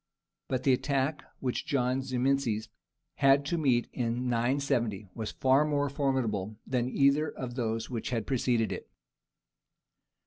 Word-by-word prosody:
_) - - -59 0.4
But 130 -1 -1
the 135 - +4
attack 140 +3 0 0.2
which 125 -2 -1
John 130 -1 +1
Zimisces 130 -4 0 0.5
had 140 0 +5
to 170 +4 -1
meet 125 -6 +2
in 120 0 -1
970 120 -4 0
was 110 -2 -5
far 135 +2 +4
more 145 -2 0
formidable 115 -8 -1
than 125 -1 0
either 140 +3 +3
of 125 -2 -6
those 115 -2 -2
which 115 -2 -3
had 115 -3 -1
preceded 120 -5 +1
it. 95 - -6
130 Hz, 140 wpm, -30 LUFS, 115-140 Hz, 0.5 s, had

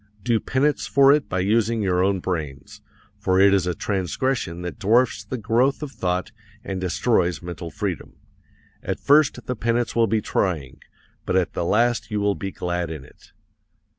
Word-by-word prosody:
Do 115 -2 +2
penance 140 +5 0
for 140 0 +5
it 145 -8 0
by 95 - -1
using 110 +2 +1
your 90 -1 +2
own 95 -1 +1
brains, 75 -8 -5 0.4
for 95 0 +1
it 100 0 +6
is 95 -3 +2
a 90 - -1
transgression 95 -1 -2
that 90 +3 -6
dwarfs 115 +5 +2
the 130 - -5
growth 120 +6 +1
of 145 - -5
thought 90 -6 -2 0.3
and 95 -1 -4
destroys 90 -1 0
mental 85 -1 -6
freedom. 75 - -4 0.7
At - - -3
first 145 0 +3
the 125 - -3
penance 120 +1 -1
will 115 -1 +3
be 110 +1 +1
trying 85 -10 -2 0.4
but - - -2
at 95 -2 +1
the - - -2
last 120 +6 +1
you 105 -1 -1
will 100 0 +1
be 95 - -5
glad 90 -2 -3
in 75 -5 -7
it. - - -20
100 Hz, 175 wpm, -23 LUFS, 90-120 Hz, 0.7 s, it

